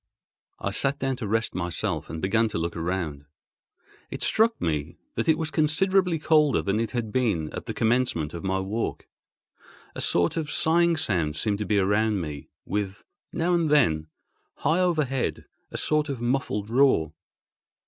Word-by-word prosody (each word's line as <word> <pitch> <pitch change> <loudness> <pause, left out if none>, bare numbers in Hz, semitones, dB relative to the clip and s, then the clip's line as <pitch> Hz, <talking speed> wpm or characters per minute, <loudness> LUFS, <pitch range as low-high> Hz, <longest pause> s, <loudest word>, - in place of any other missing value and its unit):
I 100 - -3
sat 135 +7 +1
down 135 -1 -1
to 115 - -4
rest 115 +2 0
myself, 90 -2 -2
and 80 +1 -6
began 110 +4 +2
to - - -3
look 85 +1 -2
around. 85 -4 -3 0.8
It - - -4
struck 225 +1 +3
me 75 -3 -2 0.2
that - - -1
it 160 - +5
was 160 -2 -3
considerably 180 +3 +2
colder 150 -2 +3
than 100 +2 0
it 115 -1 -1
had 120 -4 -3
been 105 -12 0
at - - -6
the - - -3
commencement 115 -10 +1
of 85 - -6
my 95 0 0
walk—a 100 +4 -7
sort 85 - +1
of 155 -3 -2
sighing 170 +2 +3
sound 85 - 0
seemed 105 +3 -1
to 105 - -3
be 105 - +2
around 105 +2 +2
me, 75 -4 -6 0.2
with, 100 0 -3 0.3
now 175 +1 0
and 170 -3 +2
then, 80 - +3 0.5
high 165 - +1
overhead, 155 -8 0 0.2
a - - -6
sort 150 -1 +1
of 135 -4 -3
muffled 120 -4 -1
roar. 120 - +3
115 Hz, 165 wpm, -26 LUFS, 95-150 Hz, 0.8 s, it